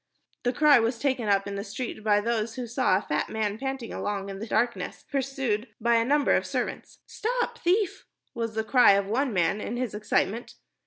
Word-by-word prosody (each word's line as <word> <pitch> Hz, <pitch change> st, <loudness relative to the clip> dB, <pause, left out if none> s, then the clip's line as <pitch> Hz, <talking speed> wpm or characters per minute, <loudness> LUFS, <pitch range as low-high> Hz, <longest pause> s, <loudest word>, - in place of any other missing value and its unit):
The 245 Hz, -, +1 dB
cry 295 Hz, 0 st, +6 dB
was 230 Hz, +1 st, 0 dB
taken 260 Hz, -3 st, -1 dB
up 195 Hz, -1 st, +3 dB
in 200 Hz, -, -5 dB
the 200 Hz, -, -3 dB
street 230 Hz, -1 st, -6 dB
by 210 Hz, -1 st, +4 dB
those 230 Hz, 0 st, -1 dB
who 250 Hz, -, -4 dB
saw 240 Hz, -5 st, +2 dB
a 200 Hz, -, -4 dB
fat 150 Hz, -, -1 dB
man 215 Hz, -1 st, -2 dB
panting 265 Hz, -3 st, -4 dB
along 200 Hz, -1 st, -3 dB
in 195 Hz, 0 st, -6 dB
the 220 Hz, -, -6 dB
darkness, 235 Hz, +2 st, -1 dB
pursued 265 Hz, -5 st, -1 dB
by 235 Hz, +1 st, +3 dB
a 230 Hz, -, +3 dB
number 285 Hz, +4 st, +3 dB
of -, -, +1 dB
servants. -, -, -4 dB
"Stop 480 Hz, +1 st, -2 dB
thief!" 370 Hz, +2 st, 0 dB, 0.3 s
was 230 Hz, -2 st, -3 dB
the 220 Hz, -, 0 dB
cry 245 Hz, -2 st, +6 dB
of 200 Hz, 0 st, +2 dB
one 250 Hz, +6 st, 0 dB
man 185 Hz, +1 st, +1 dB
in 240 Hz, -, -4 dB
his 250 Hz, -3 st, -2 dB
excitement. 215 Hz, +2 st, -1 dB
230 Hz, 205 wpm, -27 LUFS, 210-265 Hz, 0.3 s, cry